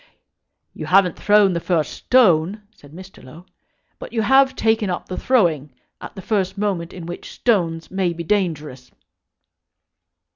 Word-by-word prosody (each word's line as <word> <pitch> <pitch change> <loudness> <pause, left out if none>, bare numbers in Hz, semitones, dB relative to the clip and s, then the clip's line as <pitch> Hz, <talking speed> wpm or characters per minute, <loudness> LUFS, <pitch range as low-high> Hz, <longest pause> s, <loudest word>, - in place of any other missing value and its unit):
"You - - -7
haven't 185 -2 +3
thrown 205 -2 +3
the 170 - -1
first 165 -3 -1
stone," 205 -4 +2
said 145 - -18
Mr. 185 +4 -13
Low; 160 +7 -14 0.5
"but - - -9
you 225 -2 -1
have 265 +3 +4
taken 220 -3 0
up 175 - -4
the 185 - -5
throwing 165 - 0 0.3
at - - -10
the 190 - -9
first 190 -2 -1
moment 190 -4 -2
in 175 -3 -9
which 175 +1 -8
stones 170 -8 -1
may 190 -2 -1
be 170 0 -6
dangerous." 155 -9 -3
185 Hz, 150 wpm, -20 LUFS, 165-210 Hz, 0.5 s, have